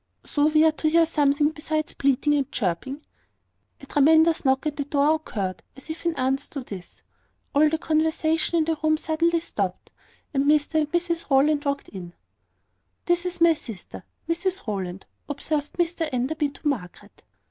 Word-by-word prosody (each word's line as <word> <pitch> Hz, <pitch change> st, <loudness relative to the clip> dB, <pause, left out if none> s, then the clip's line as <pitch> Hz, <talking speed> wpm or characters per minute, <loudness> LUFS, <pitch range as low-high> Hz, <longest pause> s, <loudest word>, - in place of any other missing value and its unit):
"So 290 Hz, 0 st, +1 dB
we 310 Hz, +1 st, +4 dB
are 320 Hz, -, +5 dB
to 310 Hz, 0 st, 0 dB
hear 330 Hz, +1 st, +5 dB
something 295 Hz, -1 st, +2 dB
besides 310 Hz, 0 st, -3 dB
bleating 275 Hz, +2 st, +2 dB
and 280 Hz, -1 st, 0 dB
chirping?" 250 Hz, -, -3 dB, 0.8 s
A -, -, -10 dB
tremendous 315 Hz, +4 st, +4 dB
knock 265 Hz, +1 st, +2 dB
at 300 Hz, -1 st, -1 dB
the 285 Hz, -, -2 dB
door 285 Hz, +1 st, +2 dB
occurred, 200 Hz, -12 st, -4 dB, 0.2 s
as 270 Hz, +4 st, -8 dB
if 330 Hz, +2 st, -5 dB
in 335 Hz, -, 0 dB
answer 265 Hz, +2 st, -1 dB
to 275 Hz, -, -3 dB
this. 195 Hz, -7 st, -10 dB, 0.5 s
All 300 Hz, +2 st, +5 dB
the 320 Hz, -, 0 dB
conversation 315 Hz, +1 st, +1 dB
in 320 Hz, -, +2 dB
the 325 Hz, 0 st, 0 dB
room 310 Hz, 0 st, +3 dB
suddenly 330 Hz, +2 st, +1 dB
stopped, 195 Hz, -, -4 dB, 0.4 s
and 275 Hz, 0 st, +1 dB
Mr 300 Hz, +1 st, +3 dB
and 300 Hz, -1 st, -1 dB
Mrs 340 Hz, -2 st, -1 dB
Rowland 290 Hz, +2 st, +3 dB
walked 280 Hz, 0 st, -2 dB
in. 175 Hz, -3 st, -9 dB, 0.9 s
"This 350 Hz, +1 st, +1 dB
is 355 Hz, -1 st, -6 dB
my 335 Hz, -1 st, +7 dB
sister, 230 Hz, -, -10 dB, 0.2 s
Mrs 365 Hz, +3 st, -1 dB
Rowland," 190 Hz, -4 st, -4 dB, 0.2 s
observed 290 Hz, +1 st, -3 dB
Mr 335 Hz, -2 st, -1 dB
Enderby 280 Hz, +4 st, -1 dB
to 285 Hz, -, -7 dB
Margaret. 205 Hz, -6 st, -5 dB
300 Hz, 170 wpm, -24 LUFS, 270-320 Hz, 0.9 s, my